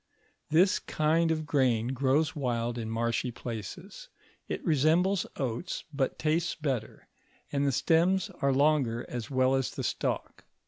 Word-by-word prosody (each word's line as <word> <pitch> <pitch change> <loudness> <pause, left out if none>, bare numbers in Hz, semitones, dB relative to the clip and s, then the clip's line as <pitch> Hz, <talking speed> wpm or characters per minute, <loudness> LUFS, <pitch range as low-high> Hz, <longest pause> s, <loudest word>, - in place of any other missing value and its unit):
This 175 +5 +4
kind 160 +2 +1
of 155 -1 -1
grain 125 -6 +2
grows 140 +4 +1
wild 120 -4 -1
in 110 -1 -4
marshy 115 +2 -1
places: 125 - -7 0.4
it - - -4
resembles 170 +5 +2
oats, 130 +3 -3
but 135 -2 -1
tastes 160 +3 0
better, 140 -7 -4 0.4
and 140 0 +1
the - - +3
stems 170 +7 +2
are 140 - +3
longer 135 -4 +2
as 120 -3 -5
well 130 -1 +2
as 135 -1 +1
the - - -6
stalk. - - -3
140 Hz, 140 wpm, -29 LUFS, 125-160 Hz, 0.4 s, This